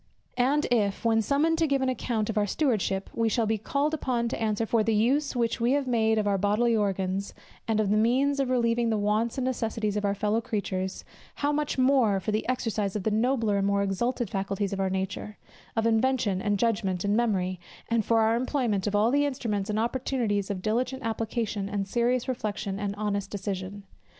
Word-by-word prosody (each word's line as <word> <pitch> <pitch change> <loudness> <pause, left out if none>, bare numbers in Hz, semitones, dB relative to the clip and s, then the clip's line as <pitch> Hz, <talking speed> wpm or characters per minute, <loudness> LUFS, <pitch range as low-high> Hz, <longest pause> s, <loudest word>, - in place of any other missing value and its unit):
And 280 +4 +3
if, 210 -3 +1
when 225 -1 +4
summoned 305 +7 +1
to 325 - +3
give 275 -2 +1
an - - +1
account 230 -4 -1
of - - -8
our 205 - +1
stewardship, 205 -7 0
we 230 -1 +1
shall 225 +1 +1
be 220 0 0
called 280 +8 -1
upon 245 -6 -1
to - - -4
answer 220 0 0
for 225 0 +2
the 220 0 +1
use 270 +7 +1
which 235 0 0
we 240 +3 +3
have 285 -1 +1
made 220 -3 +2
of 215 - +1
our 200 -1 +1
bodily 215 +4 +2
organs, 195 -1 -1 0.3
and 220 -1 +1
of 205 -2 +1
the 210 - +3
means 265 +6 +2
of 270 -2 +1
relieving 235 -2 +2
the 220 - +1
wants 210 +4 0
and 260 - -1
necessities 225 -4 -1
of 210 - -1
our 200 0 +1
fellow 210 +3 0
creatures; 190 -4 -3 0.3
how 290 0 0
much 295 -1 -1
more 255 -6 +3
for 215 - -3
the 215 +3 -1
exercise 220 -5 -1
of 205 - -2
the 220 - 0
nobler 225 -2 +1
and 195 - +1
more 200 0 +2
exalted 235 +5 -1
faculties 195 0 -2
of 195 - -3
our 190 -1 +1
nature, 190 +2 -4 0.4
of 225 0 +1
invention, 225 -4 +1
and 205 -1 +1
judgment, 200 -4 0
and 200 +1 +2
memory; 190 -6 0 0.3
and 230 -1 +1
for 225 +2 +3
our 220 +1 +3
employment 240 -6 0
of 205 - 0
all 215 +3 +3
the 285 +1 +3
instruments 220 -7 -2
and 210 - -1
opportunities 230 -4 -1
of 190 -2 -4
diligent 250 +4 -1
application, 220 -2 -2
and 200 -1 -2
serious 240 +3 +1
reflection, 215 -5 -3
and 200 -1 -2
honest 205 -1 -2
decision. 195 0 -5
220 Hz, 210 wpm, -27 LUFS, 205-245 Hz, 0.4 s, when